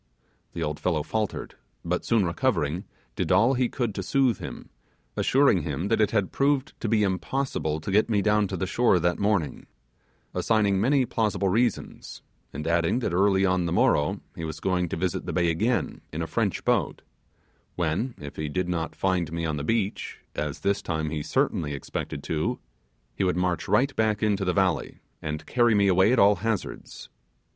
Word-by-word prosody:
The 85 - -3
old 75 -1 -3
fellow 80 -4 0
faltered, 110 +3 -3 0.3
but 90 +1 -1
soon 115 -4 +2
recovering, 85 - 0 0.3
did - - -1
all 120 +4 +5
he 125 -2 +1
could 120 -5 -2
to 95 - -4
soothe 125 +1 +1
him, - - -8 0.4
assuring - - +3
him 95 +5 -3
that - - +2
it 105 - +3
had 105 -5 0
proved 140 +1 +1
to 115 - -1
be 110 -1 +3
impossible 95 - -1
to 90 - -5
get 105 +4 +3
me 100 -3 +2
down 105 -1 +3
to 95 - -4
the 95 - -1
shore 115 +1 +3
that 85 +1 0
morning; 100 -8 0 0.7
assigning 100 -4 +2
many 135 +3 +3
plausible 105 -4 0
reasons, 115 +3 -1 0.3
and 75 +2 -6
adding 85 +5 +2
that 120 -8 -2
early 95 +1 +3
on 90 -2 +1
the - - -2
morrow 75 -3 +2
he 80 - -6
was 80 -1 -5
going 90 -1 0
to - - -3
visit 90 +1 -2
the - - -3
bay 85 -2 +2
again 110 +9 -1
in - - -3
a - - -2
French - - -1
boat, - - 0 0.7
when, 90 +9 -1
if 75 -1 -9
he 75 -1 -3
did 90 +4 -1
not 85 -2 -2
find 90 -2 0
me 85 0 -2
on 80 -2 -1
the 70 - -3
beach 105 +3 -1 0.2
as 75 +1 -4
this 100 0 +1
time 80 -2 -2
he 80 -2 -2
certainly 75 0 0
expected 70 - -5
to 80 -1 -1 0.6
he - - -2
would 90 -2 +1
march 90 -3 -1
right 130 +7 +2
back 110 -1 +1
into 105 -2 +1
the 90 - +2
valley, 95 -4 0 0.2
and 75 0 -4
carry 120 -2 +3
me 100 -1 +4
away 95 +3 +4
at 130 - +3
all 100 -1 +5
hazards. 110 -1 -4
95 Hz, 190 wpm, -26 LUFS, 85-110 Hz, 0.7 s, all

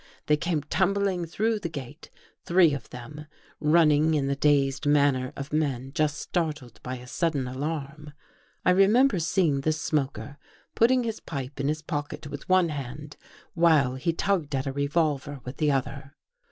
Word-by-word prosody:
They; 150 - +4
came 155 -1 -1
tumbling 190 0 0
through 220 +6 0
the 170 - -4
gate, 145 -2 -9 0.3
three 170 -3 +4
of 140 -5 -6
them, 125 +4 -9
j 150 - -9 0.3
running 155 0 +4
in 140 -2 +1
the 140 0 0
dazed 140 0 +2
manner 140 -3 +3
of 140 +1 -7
men 135 -4 -1
just 155 -2 0
startled 150 -8 -3
by 130 0 -5
• - - -11
a 125 - -11
sudden 145 0 -1
alarm. 150 +2 -5 0.5
I 180 - +5
remember 200 +4 +4
seeing 165 -4 +1
the 155 - +1
smoker 145 -2 -2 0.2
| - - -33
putting 250 +2 +4
his 225 -2 -3
pipe 135 -2 -6
in 140 - 0
his 155 +1 -2
pocket 150 -3 -4
with 145 +2 -8
one 185 -2 +4
hand 145 +1 -6 0.4
while 160 -7 +4
he 130 +6 -1
tugged 165 -4 -1
at 135 +1 -1
a 135 - -2
revolver 145 -1 -1
with 125 +2 -7
the 150 -1 +2
other. 140 +1 -3
150 Hz, 175 wpm, -26 LUFS, 140-170 Hz, 0.5 s, I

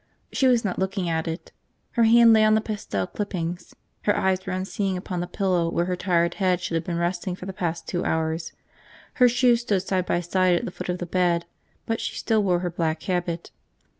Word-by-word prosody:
She 270 - +2
was 240 -3 +3
not 190 - -2
looking 190 -2 -1
at 160 0 -1
it. 165 +2 -5 0.4
Her 235 -2 +3
hand 230 0 +7
lay 220 -1 +5
on 215 0 +5
the - - +4
pasted 205 - -4
clippings, 180 -4 -4 0.3
her 205 - +3
eyes 190 0 +1
were 190 - -5
unseeing 190 +1 -2
upon 180 0 -4
the 175 - -3
pillow 180 -4 0
where 170 +1 0
her 180 0 -1
tired 170 -2 +1
head 185 -2 +3
should 175 - -4
have 165 - 0
been 175 -3 -3
resting 175 +1 -1
for 180 - -9
the 190 - -5
past 170 -2 -3
two 175 0 -2
hours. 160 0 -1 0.7
Her 250 - +8
shoes 245 -1 +3
stood 205 -6 0
side 185 -2 -1
by 175 - +1
side 180 +1 +2
at - - -1
the - - -5
foot - - -7
of 180 - 0
the 175 - -4
bed, 175 -1 +1 0.4
but 225 0 -2
she - - -4
still 220 -1 +1
wore 180 -3 +1
her 175 -1 -2
black 160 -2 -2
habit. 175 -2 -2
180 Hz, 225 wpm, -25 LUFS, 170-200 Hz, 0.7 s, Her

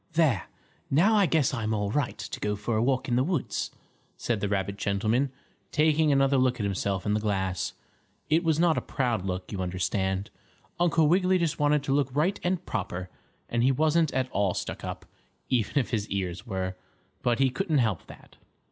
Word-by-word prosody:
"There, 145 - +2 0.4
now 175 +11 +4
I 205 -3 +4
guess 150 -5 +2
I'm 110 -3 -1
all 105 -1 -1
right 145 -1 -1
to 105 -1 -6
go 105 0 -1
for 105 +3 -2
a 110 - +2
walk 130 +1 +1
in 120 - +1
the 130 - +3
woods," 165 -2 -1 0.5
said 120 -3 -1
the 100 0 -1
rabbit 100 0 -1
gentleman, 110 +7 +1 0.4
taking 155 0 +3
another 135 0 +3
look 130 -1 +2
at - - -1
himself 100 -1 -1
in 105 - +1
the 105 - +2
glass. 95 -3 -1 0.5
It 160 +3 +3
was 160 -2 +2
not 170 -2 +4
a - - -8
proud 120 -8 -1
look, 90 0 -4
you 100 -3 -3
understand. 95 +2 -1 0.5
Uncle 165 -3 +3
Wiggily 185 +3 +3
just 170 -4 -1
wanted 145 -1 +3
to 135 - 0
look 140 -2 +2
right 170 +7 +1
and 180 0 -1
proper, 90 +1 -4 0.4
and 120 - 0
he 130 +3 +4
wasn't 155 +3 +2
at 130 0 0
all 100 -2 +1
stuck - - -4
up, - - -6 0.4
even 125 0 0
if 135 - +1
his 110 -3 -1
ears 95 +2 -3
were, 95 -3 -3 0.5
but 120 -1 +1
he 135 -1 +3
couldn't 160 +2 0
help 110 -9 0
that. - - -15
125 Hz, 195 wpm, -27 LUFS, 100-150 Hz, 0.5 s, now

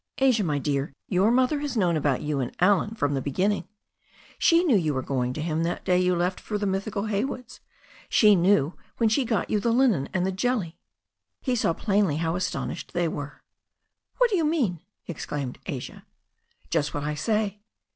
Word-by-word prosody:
"Asia, 255 -5 +3
my 150 -5 0
dear, 140 -1 -2
your 190 +2 +3
mother 255 +4 +2
has 285 -4 -3
known 175 -5 +2
about 145 -4 0
you 150 -2 -1
and 125 -2 -3
Allen 205 +4 +3
from 145 -8 0
the 135 - -1
beginning. 190 +10 0 0.7
She 335 +1 +5
knew 300 -10 +3
you 155 -7 +1
were 130 - -1
going 125 -2 -1
to 150 - -4
him 160 -1 -1
that 170 +1 -2
day 180 0 +3
you 180 0 +2
left 180 +2 -1
for 210 - -3
the 205 - -2
mythical 200 +1 -2
Haywoods. 220 +3 -3 0.5
She 210 -2 +6
knew 175 -4 +3 0.2
when 230 -2 +3
she 250 +4 +1
got 225 -3 -1
you 210 - +2
the 235 - 0
linen 230 - +2
and 185 -1 0
the 190 - 0
jelly." 190 -4 -1 0.6
He 255 -2 -1
saw 190 -7 +1
plainly 195 -6 +1
how 165 +1 -1
astonished 180 -1 -3
they 175 -1 +1
were. 145 -2 -6 0.7
'What - - +3
do 395 - +2
you 330 - +1
mean?" 275 - +1 0.3
exclaimed 145 -5 -5
Asia. - - -6 0.7
'Just 150 0 0
what 145 - -2
I 150 0 -1
say." 210 +6 -1
185 Hz, 190 wpm, -26 LUFS, 155-220 Hz, 0.7 s, She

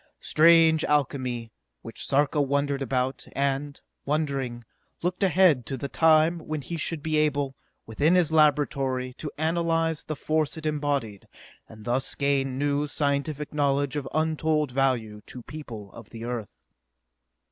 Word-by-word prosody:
Strange 160 0 +5
alchemy, 130 -5 -1 0.3
which 115 - -5
Sarka 145 +2 +2
wondered 140 0 0
about 130 0 -2
and, 140 +1 -1 0.2
wondering, 140 -5 -2 0.4
looked 180 +1 -1
ahead 180 -8 +4
to 135 - -3
the 140 - -4
time 160 +3 +4
when 155 -1 -4
he 170 - -5
should 160 -1 -3
be 155 -1 0
able, 145 -3 +1 0.3
within 145 +10 +2
his 175 -4 +3
laboratory, 140 -4 +2
to 155 - -4
analyze 165 0 0
the 155 - -4
force 155 +1 -1
it 160 - -8
embodied, 145 -9 -2 0.4
and 110 -1 -13
thus 125 +2 -1
gain 135 -2 0
new 145 +1 0
scientific 145 +1 -2
knowledge 140 -1 +1
of 145 -3 -3
untold 155 -2 0
value 120 -5 0
to 125 - -9
people 115 -10 -9
of - - -12
the 115 0 -8
Earth. 120 -4 -6
145 Hz, 140 wpm, -26 LUFS, 130-155 Hz, 0.4 s, Strange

